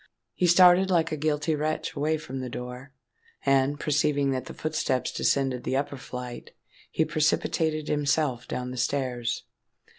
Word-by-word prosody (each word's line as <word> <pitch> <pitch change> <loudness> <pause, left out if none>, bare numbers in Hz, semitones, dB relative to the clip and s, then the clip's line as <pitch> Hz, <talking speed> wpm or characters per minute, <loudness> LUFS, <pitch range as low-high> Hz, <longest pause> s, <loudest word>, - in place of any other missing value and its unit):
He 180 - +1
started 180 +2 +6
like 165 -3 +2
a - - 0
guilty 150 +1 0
wretch 155 +1 -2
away 155 +2 +1
from 135 -3 -7
the 130 -1 -4
door: 125 +3 -7 0.5
and, 135 +1 +2
perceiving 145 -2 +1
that 130 -1 -2
the - - -8
footsteps 155 -5 -1
descended 130 -3 0
the 130 - 0
upper 140 0 -2
flight, 125 -1 -8 0.4
he 160 - +1
precipitated 155 0 0
himself 140 -4 0
down 125 0 -4
the 125 - -7
stairs. 125 -2 -1
145 Hz, 150 wpm, -27 LUFS, 130-155 Hz, 0.5 s, started